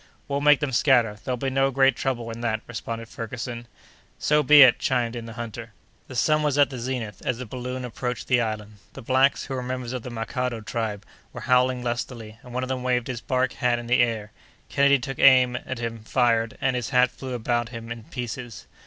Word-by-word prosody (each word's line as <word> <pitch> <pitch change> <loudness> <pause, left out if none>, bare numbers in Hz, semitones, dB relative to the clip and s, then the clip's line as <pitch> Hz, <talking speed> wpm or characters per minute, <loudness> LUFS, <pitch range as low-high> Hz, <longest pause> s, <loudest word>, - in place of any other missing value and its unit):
"We'll 140 0 -1
make 150 -1 +5
them 150 -3 -1
scatter; 120 -5 +3
there'll 125 -1 -2
be 135 +2 -2
no 135 +1 +2
great 135 0 +3
trouble 120 -3 -2
in 115 +1 -7
that," 110 -2 -1
responded 115 -1 -6
Ferguson. 120 +1 -6 0.5
"So 150 0 +2
be 150 0 +9
it," 125 -2 +6
chimed 120 -1 0
in 115 -1 -6
the 115 - -8
hunter. 115 -1 -7 0.3
The 130 - -9
sun 155 +5 +3
was 145 -2 0
at 145 -1 +4
the 130 - -6
zenith 120 -5 -4
as 125 - -1
the 125 - -6
balloon 125 +2 -5
approached 125 0 -4
the 125 -2 +3
island. 105 -2 -4 0.2
The 135 - -10
blacks, 130 +3 +3
who 135 - -6
were 130 - -2
members 125 -1 -4
of 125 - -3
the 125 - -7
Makado 120 0 -3
tribe, 105 -3 -3 0.3
were - - -7
howling 125 0 +2
lustily, 120 -2 -4
and 125 - -13
one 125 +1 -2
of - - -3
them 130 -1 -2
waved 125 -1 0
his 120 -2 -4
bark 130 -1 0
hat 125 -1 +1
in 120 - -6
the 125 +1 +2
air. 110 -3 -1 0.4
Kennedy 140 0 +4
took 135 +1 -6
aim 125 -2 +6
at 130 - -4
him, 115 -1 -4
fired, 115 0 +1
and 130 -1 +1
his 125 -1 -2
hat 125 -1 +4
flew 130 0 -7
about 120 0 -1
him 115 -1 -8
in 115 -2 -7
pieces. 120 -1 -6
125 Hz, 220 wpm, -25 LUFS, 115-130 Hz, 0.5 s, be